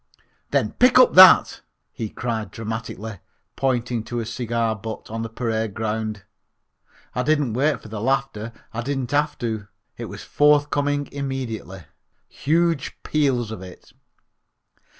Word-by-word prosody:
"Then -, -, +1 dB
pick 250 Hz, 0 st, +4 dB
up 255 Hz, -, +7 dB
that," 185 Hz, 0 st, +8 dB, 0.3 s
he 110 Hz, -, -5 dB
cried 110 Hz, -3 st, -3 dB
dramatically, 110 Hz, -2 st, -6 dB, 0.4 s
pointing 120 Hz, -3 st, -1 dB
to 120 Hz, +1 st, -3 dB
a 115 Hz, -, -3 dB
cigar 115 Hz, -1 st, -1 dB
butt 110 Hz, 0 st, -8 dB
on 115 Hz, 0 st, -3 dB
the 115 Hz, -, -4 dB
parade 110 Hz, -2 st, -2 dB
ground. 110 Hz, -1 st, -3 dB, 0.9 s
I 125 Hz, -, -1 dB
didn't 145 Hz, -3 st, +1 dB
wait 145 Hz, +5 st, +1 dB
for -, -, -10 dB
the 105 Hz, -1 st, -6 dB
laughter. 115 Hz, -3 st, -1 dB, 0.2 s
I 115 Hz, -, -3 dB
didn't 135 Hz, -1 st, -3 dB
have 145 Hz, +1 st, +1 dB
to. 110 Hz, -3 st, -4 dB, 0.3 s
It -, -, -5 dB
was -, -, -9 dB
forthcoming 145 Hz, -1 st, +2 dB
immediately. 130 Hz, -9 st, -5 dB, 0.4 s
Huge 165 Hz, 0 st, 0 dB
peals 130 Hz, -7 st, 0 dB
of 110 Hz, -, -7 dB
it. 90 Hz, -1 st, -13 dB
120 Hz, 135 wpm, -23 LUFS, 110-140 Hz, 0.9 s, that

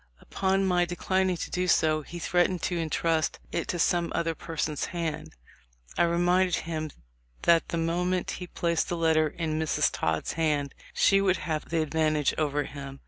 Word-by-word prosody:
Upon 195 Hz, 0 st, 0 dB
my 180 Hz, -2 st, +3 dB
declining 185 Hz, +1 st, 0 dB
to -, -, -5 dB
do 180 Hz, 0 st, 0 dB
so 155 Hz, -3 st, +3 dB
he 170 Hz, +4 st, -9 dB
threatened 175 Hz, +1 st, +1 dB
to 180 Hz, -, 0 dB
intrust 165 Hz, -1 st, 0 dB
it 170 Hz, -, -2 dB
to 175 Hz, -, -2 dB
some 170 Hz, 0 st, +1 dB
other 165 Hz, -1 st, 0 dB
person's 155 Hz, -2 st, -3 dB
hand. 165 Hz, -3 st, -4 dB, 0.6 s
I -, -, +3 dB
reminded 175 Hz, +1 st, +2 dB
him 155 Hz, -2 st, -3 dB, 0.5 s
that 170 Hz, -1 st, +4 dB
the 170 Hz, -, -2 dB
moment 175 Hz, +2 st, 0 dB
he 180 Hz, -, -5 dB
placed 170 Hz, -1 st, -1 dB
the 175 Hz, -, -1 dB
letter 160 Hz, -1 st, +3 dB
in 155 Hz, 0 st, -3 dB
Miss 160 Hz, -2 st, +1 dB
Todd's 80 Hz, -1 st, -1 dB
hand, 150 Hz, -4 st, 0 dB, 0.2 s
she 195 Hz, 0 st, +4 dB
would 190 Hz, -2 st, +2 dB
have 155 Hz, -2 st, -3 dB
the 165 Hz, -1 st, +1 dB
advantage 155 Hz, -2 st, +1 dB
over 145 Hz, -1 st, 0 dB
him. 140 Hz, -1 st, -8 dB
165 Hz, 170 wpm, -28 LUFS, 155-175 Hz, 0.6 s, that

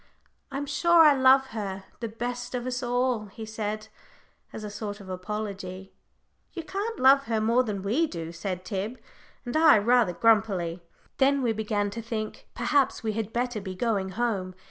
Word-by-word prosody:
"I'm 280 Hz, +1 st, -3 dB
sure 330 Hz, +4 st, +5 dB
I 300 Hz, -, +8 dB
love 265 Hz, 0 st, +5 dB
her 195 Hz, -3 st, -5 dB, 0.2 s
the 230 Hz, -, -3 dB
best 245 Hz, +3 st, -4 dB
of 245 Hz, -1 st, -3 dB
us 250 Hz, 0 st, -2 dB
all," 245 Hz, -3 st, 0 dB
he 220 Hz, +3 st, -9 dB
said, 215 Hz, 0 st, -4 dB, 0.6 s
as 215 Hz, -, -7 dB
a 210 Hz, -, -5 dB
sort 205 Hz, 0 st, -5 dB
of 195 Hz, -2 st, -11 dB
apology. 190 Hz, -1 st, -5 dB, 0.6 s
"You 335 Hz, -, -5 dB
can't 410 Hz, +7 st, -4 dB
love 275 Hz, +2 st, +6 dB
her 225 Hz, -1 st, 0 dB
more 230 Hz, +3 st, +3 dB
than 205 Hz, -5 st, -4 dB
we 255 Hz, +12 st, +1 dB
do," 165 Hz, -, -6 dB
said 180 Hz, +2 st, -5 dB
Tib 210 Hz, +5 st, -4 dB, 0.5 s
and 245 Hz, -, -4 dB
I, 315 Hz, -5 st, +7 dB
rather 225 Hz, -2 st, +3 dB
grumpily. 195 Hz, -5 st, +2 dB, 0.4 s
Then 275 Hz, 0 st, +3 dB
we 230 Hz, -2 st, +2 dB
began 210 Hz, -2 st, -1 dB
to 230 Hz, +3 st, -5 dB
think 220 Hz, -1 st, -5 dB
perhaps 265 Hz, +1 st, +1 dB
we 220 Hz, -1 st, -1 dB
had 220 Hz, 0 st, -3 dB
better 240 Hz, -2 st, -2 dB
be 190 Hz, -1 st, -6 dB
going 200 Hz, -2 st, 0 dB
home. 200 Hz, -6 st, -1 dB
220 Hz, 175 wpm, -27 LUFS, 200-250 Hz, 0.6 s, I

